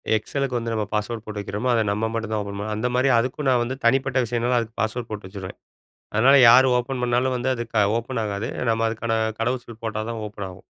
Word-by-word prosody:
XL 140 +6 -2
லுக்கு 125 -3 -1
வந்து 115 -1 -3
நம்ம 110 -1 -1
password 110 +1 -2
போட்டு 105 -1 -5
வெக்கிறமோ. 105 +5 -3
அத 115 - +3
நம்ம 110 +2 0
மட்டும் 110 -1 -3
தான் 110 - 0
ஓப்பன் 100 - -6
பண்ண - - -4
முடியும். 105 0 -3
அந்த 120 +3 0
மாதிரி 130 +2 +3
அதுக்கும் 130 +4 -1
நான் 125 -2 +3
வந்து 130 +2 -3
தனிப்பட்ட 130 +1 +2
விஷயம்னால, 120 +2 0
அதுக்கு 115 -1 -6
பாஸ்வேர்ட் 110 +1 -2
போட்டு 105 -3 -6
வச்சுருவேன். 95 -1 -8 0.6
அதனால 125 +6 +5
யார் 130 +3 +8
ஓப்பன் 125 +1 -3
பண்ணாலும் 125 +2 +1
வந்து 130 +2 -1
அது 120 - -3
க 105 -2 +4
ஓப்பன் 120 0 -4
ஆகாது. 105 +2 -3 0.2
நம்ம 115 0 +1
அதுக்கான 115 0 -2 0.3
கடவு 125 +2 0
சொல் 115 -1 -13
போட்டா 110 -1 -2
தான் 115 -1 -4
ஓப்பன் 100 -1 -6
ஆகும். 90 - -14
115 Hz, 235 wpm, -23 LUFS, 110-125 Hz, 0.6 s, யார்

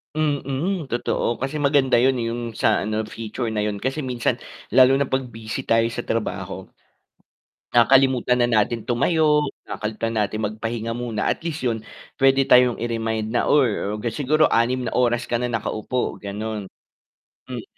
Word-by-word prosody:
Mm, 150 +2 -1
totoo 120 -1 -1
kasi 135 +4 -3
maganda 140 -3 +3
yun 130 +1 +3
yung 115 +1 -2
sa 110 -1 +1
ano 110 +1 -2
feature 115 +2 -5
na 105 -1 -1
yun, 105 -1 -2
kasi 135 +5 -2
minsan, 125 -2 0 0.3
lalo 130 0 +6
na 140 - +1
pag 130 0 0
busy 110 -1 -5
tayo 115 0 +3
sa 120 +1 -5
trabaho. 115 -1 -3 1.0
Nakakalimutan 125 0 +4
na - - +3
natin 115 +1 -1
tumayo, 150 +5 +2 0.2
nakakalimutan 110 +1 -4
natin 105 +1 -1
magpahinga 115 +2 -3
muna, 115 -2 -1
at - - -3
least 160 -2 -4
yun 115 -3 0 0.4
pwede 135 0 +4
tayong 125 -2 +5
i-remind 115 -2 -2
na 120 - +1
or 115 -7 +2 0.2
siguro 150 +5 +2
6 125 +2 +2
na 115 - -3
oras 120 -1 +2
ka 120 - +1
na 125 - -1
nakaupo, 115 +1 -2
ganon. 105 0 -5 0.8
Hmm. - - -6
120 Hz, 150 wpm, -22 LUFS, 110-130 Hz, 1.0 s, lalo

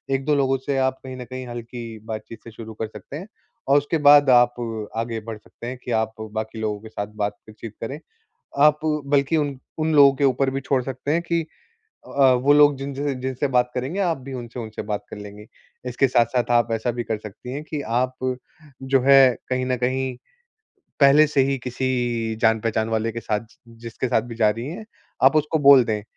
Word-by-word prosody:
1-2 140 +3 0
लोगों 135 -1 +2
से 140 -1 -1
आप 130 0 +1
कहीं 130 -1 -7
न 125 - -7
कहीं 130 0 -7
हल्की 120 -1 -7
बातचीत 110 0 -7
से 115 - -11
शुरू 110 0 -9
कर 110 - -1
सकते 105 +6 -10
हैं। 185 +6 -8 0.4
और 140 - +5
उसके 145 +3 0
बाद 145 -1 +7
आप 120 -1 +5 0.4
आगे 115 0 -2
बढ़ 110 -1 -5
सकते 110 +2 -12
हैं 125 +1 -5
कि 125 - -5
आप 110 0 -4 0.2
बाकी 110 +1 -4
लोगों 105 -1 -2
के 110 - -11
साथ 100 -2 -5 0.2
बातचीत 105 +1 -7
करें। 135 +6 -5 0.7
आप 150 0 +4
बल्कि 145 0 +1
उन 145 -3 -2 0.2
उन 155 0 0
लोगों 140 -2 +7
के 140 - -2
ऊपर 135 0 +2
भी 135 +1 -3
छोड़ 130 0 0
सकते 135 +2 -4
हैं 170 - +1
कि 170 -1 -1 0.6
अ, - - -13 0.2
वो 130 +3 +3
लोग 145 -1 +6
जिन 140 +1 -5
जिनसे-जिनसे 130 -1 -2
बात 125 -1 +2
करेंगे 130 +9 -3
आप 170 -5 0
भी 135 +1 -9
उनसे-उनसे 120 -3 -6
बात 105 -1 -4
कर - - -7
लेंगी। 105 +1 -10 0.4
इसके 125 +2 +2
साथ-साथ 120 0 +1
आप 120 -1 +2
ऐसा 115 +2 -1
भी 120 0 -4
कर 110 -1 -2
सकती 110 +4 -9
है 140 - -4
कि 155 -1 -5 0.2
आप 130 +1 -1 0.7
जो 135 0 +2
है 135 +1 +7 0.3
कहीं 130 0 -1
न 130 0 0
कहीं 130 +1 -1 0.8
पहले 145 +2 +7
से 145 -2 +2
ही 135 0 0
किसी 120 -3 -1
जान-पहचान 110 -1 +1
वाले 115 0 -1
के 115 - -5
साथ 105 -2 -1
जि 115 +1 -21
जिसके 115 +2 -4
साथ 120 -2 +2
भी - - -6
जा 110 -2 +3
रही 115 +4 -4
है, 180 +9 -7 0.4
आप 135 +3 +6
उसको 155 +1 +1
बोल 140 -2 +8
दें, 105 -2 -2
125 Hz, 205 wpm, -23 LUFS, 115-140 Hz, 0.8 s, बोल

